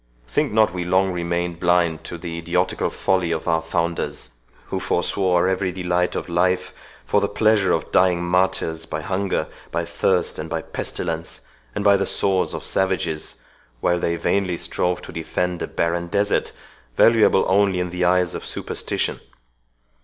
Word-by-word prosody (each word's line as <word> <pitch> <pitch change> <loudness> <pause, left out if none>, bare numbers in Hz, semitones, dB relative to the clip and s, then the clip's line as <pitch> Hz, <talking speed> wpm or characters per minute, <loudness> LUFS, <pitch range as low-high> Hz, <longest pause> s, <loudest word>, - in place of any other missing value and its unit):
Think - - 0
not 110 -3 +3
we 90 -1 -2
long 95 +2 +2
remained 85 -1 -2
blind 85 -2 +2
to 85 - -6
the 85 -1 -5
idiotical 90 +2 0
folly 95 -3 0
of 80 +1 -2
our 80 -1 +2
founders, 85 +1 -2 0.4
who - - -2
forswore 90 -2 +1
every 95 0 0
delight 90 -1 0
of - - -3
life 90 +1 +1 0.3
for - - +2
the - - +2
pleasure 110 -3 +3
of - - -1
dying 90 -1 +3
martyrs 85 -2 0
by 75 - -4
hunger, 95 +3 -1 0.2
by 85 - -2
thirst, 90 +1 0
and 80 +1 -5
by 80 -1 -2
pestilence, 80 -2 -4 0.3
and - - -1
by 100 -1 +6
the - - -1
swords 95 -2 +1
of - - -6
savages, 95 -5 -1 0.4
while 90 +7 +1
they 85 0 0
vainly 90 +1 0
strove 90 +1 -1
to - - -8
defend 90 +2 -2
a - - -2
barren 85 +1 -1
desert, 100 +3 0 0.5
valuable 110 -4 +5
only 95 -1 +3
in 90 -1 -2
the 90 0 -2
eyes 90 -1 +3
of - - -5
superstition. - - -2
90 Hz, 160 wpm, -22 LUFS, 85-95 Hz, 0.5 s, by